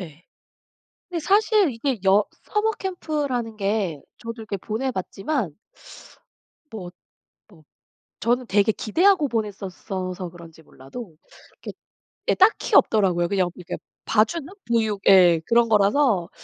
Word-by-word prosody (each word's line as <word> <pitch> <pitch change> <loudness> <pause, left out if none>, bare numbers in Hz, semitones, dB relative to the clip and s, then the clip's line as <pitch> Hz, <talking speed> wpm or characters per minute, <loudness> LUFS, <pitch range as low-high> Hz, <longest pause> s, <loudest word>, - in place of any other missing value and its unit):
예. 165 -1 -11 0.8
근데 345 -2 -3
사실 410 -1 +3
이게 240 +1 -2
여 200 +2 +5 0.2
서머 425 +1 0
캠프라는 295 - -3
게 195 -7 -1 0.2
저도 230 0 -6
이렇게 205 -2 -4
보내 225 +7 -3
봤지만 195 - -3 1.1
뭐 185 -6 -7 0.6
뭐 165 -6 -19 0.6
저는 245 +1 0
되게 205 +2 +3
기대하고 330 - +2
보냈었어서 190 -4 -4
그런지 165 -2 -14
몰라도 160 - -11 0.5
이렇게 - - -6 0.6
예 - - +5
딱히 390 +4 +3
없더라고요. 180 -5 +4
그냥 185 -3 +1
이렇게 180 - -7 0.3
봐주는? 230 +8 +1 0.2
보육 220 -4 +1
예. 175 -4 +6
그런 235 0 +3
거라서 210 -2 +3
215 Hz, 265 characters per minute, -23 LUFS, 185-260 Hz, 1.1 s, 예